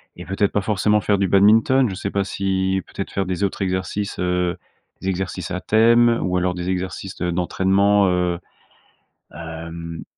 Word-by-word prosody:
et 90 - -9
peut-être 95 +2 -1
pas 105 - +1
forcément 105 +1 +1
faire 100 +2 +1
du 100 -1 +1
badminton. 110 +7 +4
Je 95 - -5
sais 100 - -4
pas 100 0 0
si, 95 -1 -1
peut-être, 100 - -6
faire 95 - -1
des 95 +1 -2
autres 100 0 -2
exercices, 95 +2 -2
heu 90 -1 0 0.4
des 95 - -2
exercices 95 -1 -3
à 90 - -2
thème, 115 +2 +4
ou 90 0 0
alors 90 0 0
des 90 0 -4
exercices 95 +1 -4
de 90 - -2
d'entraînement, 95 +3 +2
heu 90 -1 0 0.9
hem 85 0 -7
95 Hz, 170 wpm, -21 LUFS, 90-100 Hz, 0.9 s, badminton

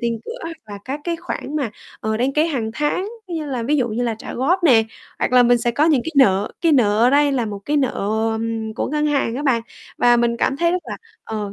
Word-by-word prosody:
tiền 235 -1 -1
cửa, 475 +2 -7
hoặc 330 0 -6
là 205 -1 -8
các 275 +3 -4
cái 340 -1 -1
khoản 305 -2 -5
mà, 275 -7 -1 0.3
ờ, 220 0 -1
đăng 255 +4 0
ký 305 +3 +2
hàng 245 -9 -2
tháng, 300 - -1 0.2
như 320 -3 -4
là 255 -4 -3
ví 295 +6 +1
dụ 245 -3 +1
như 230 +2 -2
là 235 -2 0
trả - - -8
góp 345 +9 +1
nè, 240 -7 +6 0.4
hoặc - - -1
là 250 -1 +7
mình 240 0 +4
sẽ 240 - 0
có 285 +6 +2
những 310 -5 +3
cái 320 - -3
nợ, 200 -6 +4
cái 330 -2 +3
nợ 215 -7 +3
ở 240 +3 +5
đây 285 0 +3
là 245 -4 0
một 205 -1 -5
cái 295 +1 0
nợ, 265 -3 +2 0.4
ừm, 220 0 -3
của - - -2
ngân 300 +1 0
hàng 275 -6 0
á 285 - -3
bạn, 245 -5 +2 0.4
và 240 0 +5
mình 235 0 +1
cảm 265 - 0
thấy 340 +3 +2
rất 365 0 -1
là - - -6 0.3
ờ, 210 -2 -4
255 Hz, 265 wpm, -20 LUFS, 230-300 Hz, 0.4 s, là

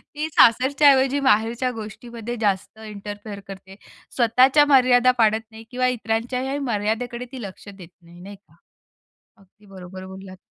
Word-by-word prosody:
ती 300 +1 -3
सासरच्या 275 +4 +4
ऐवजी 270 +1 +2
माहेरच्या 240 -1 +1
गोष्टीमध्ये 230 +1 -8
जास्त 200 +1 -2
इंटरफेअर 205 0 -8
करते. 190 0 -11 0.4
स्वतःच्या 260 +5 +4
मर्यादा 255 -3 +4
पाळत 220 0 +3
नाही 220 0 -12
किंवा 255 0 0
इतरांच्याही 250 +3 -2
मर्यादेकडे 235 0 -3
ती 260 -2 -8
लक्ष 195 -1 -10
देत 190 -4 -13
नाही, 170 +1 -17
नाही 200 +2 -10
का, 200 - -27 0.8
अगदी 200 +1 -25
बरोबर 185 -1 -11
बोललात. 190 0 -11
225 Hz, 135 wpm, -22 LUFS, 200-255 Hz, 0.8 s, सासरच्या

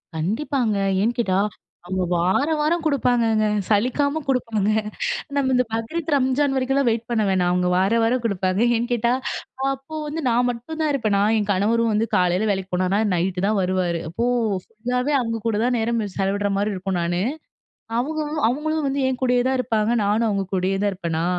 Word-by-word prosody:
கண்டிப்பாங்க. 220 - -1 0.2
ஏன் 230 +4 +1
கேட்டா, 195 -5 +1 0.5
அவங்க 185 +1 -1
வார 185 - +2
வாரம் 325 +2 +1
கொடுப்பாங்கங்க. 235 -6 +2 0.2
சலிக்காம 270 +8 +1
குடுப்பாங்க. 230 -6 0 0.7
நம்ம 275 -2 +1
இந்த 250 - +4
பக்ரீத், 295 +9 -3
ரம்ஜான் 270 +1 +1
வரைக்கும்லாம் 265 0 +1
வெயிட் 230 0 -1
பண்ண 230 -2 +1
வேணாம். 180 -2 +2
அவுங்க 180 0 +1
வார 190 +3 +2
வாரம் 240 +2 +1
குடுப்பாங்க. 190 -2 0 0.2
ஏன் 235 +2 -2
கேட்டா, 235 0 +1 0.6
அப்போ 270 +4 -9
வந்து 310 +2 -4
நான் 245 +1 +2
மட்டும் 245 +7 -6
தான் 310 - +1
இருப்பேனா, 215 -7 +1 0.2
என் 205 - -1
கணவரும் 225 +4 +2
வந்து 220 +2 +1
காலையில 180 +3 +2
வேலைக்கு 190 -1 -3
போனாருன்னா, 185 +3 +1
நைட்‌டு 180 +1 0
தான் 210 -1 +1
வருவாரு. 180 -2 0
அப்போ 225 +9 -2 0.4
ஃபுல்லாவே 250 +5 -2
அவுங்கக்கூட 230 -2 -2
தான் 250 0 +1
நேரம் 230 0 0
செலவிட்றமாரி 200 +1 0
இருக்கும் 185 -1 -2
நானு. 175 +1 -1 0.8
அவுக 310 +5 -2 0.3
அவுங்களும் 310 +3 -1
வந்து 275 +1 -1
என் 255 - -3
கூடயே 250 -1 +3
தான் 265 - +1
இருப்பாங்க. 225 -2 0
நானும் 215 +3 +2
அவுங்க 200 -2 -1
கூடயே 185 +1 0
தான் 205 - +2
இருப்பன்னா! 170 -3 -2
225 Hz, 165 wpm, -22 LUFS, 195-255 Hz, 0.8 s, இந்த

